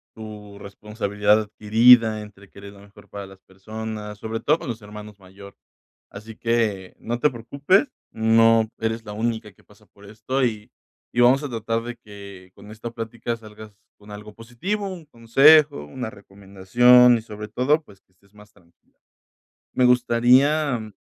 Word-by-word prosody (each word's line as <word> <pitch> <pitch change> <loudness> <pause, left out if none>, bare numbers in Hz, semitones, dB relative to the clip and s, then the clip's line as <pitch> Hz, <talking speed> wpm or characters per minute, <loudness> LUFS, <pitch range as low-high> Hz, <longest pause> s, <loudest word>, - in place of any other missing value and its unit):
tu 105 -2 -11
responsabilidad 105 +1 -1
adquirida, 110 +1 +4
entre 100 -2 -15
querer 100 0 -13
lo 100 - -17
mejor 100 0 -18
para 100 -1 -8
las 95 0 -17
personas, 105 +2 -8
sobre 110 +1 -5
todo 155 +2 +1
con - - -9
los 115 -1 -6
hermanos 105 0 -12
mayor. 100 +1 -15 0.6
Así 110 +2 -11
que 110 -5 -2
no 120 +1 -4
te 150 - +3
preocupes, 140 - 0 0.2
no 115 0 +3
eres 115 0 -3
la 105 - -7
única 110 -2 -4
que - - -27
pasa 105 0 -23
por 100 - -21
esto, 110 +6 -3
y 110 -1 -4 0.4
y 120 - +1
vamos 130 +4 +4
a 145 - -5
tratar 115 0 -3
de 120 0 -8
que 100 -3 -14
con 105 +1 -15
esta 110 +2 -8
plática 115 +1 -5
salgas 110 -1 -14 0.2
con 105 0 -17
algo 105 +1 -11
positivo, 185 - -5
un 180 -4 -9
consejo, 140 - +4
una 120 - -7
recomendación, 100 +5 +3
y - - -10
sobre 105 -1 -9
todo, 145 +8 0
pues, 100 -8 -20
que 95 - -42
estés 100 +2 -31
más 105 0 -18
tranquila. 90 - -30 0.7
Me 125 - +1
gustaría, 125 +3 +3
mm 110 -2 -10
110 Hz, 165 wpm, -22 LUFS, 105-120 Hz, 0.7 s, adquirida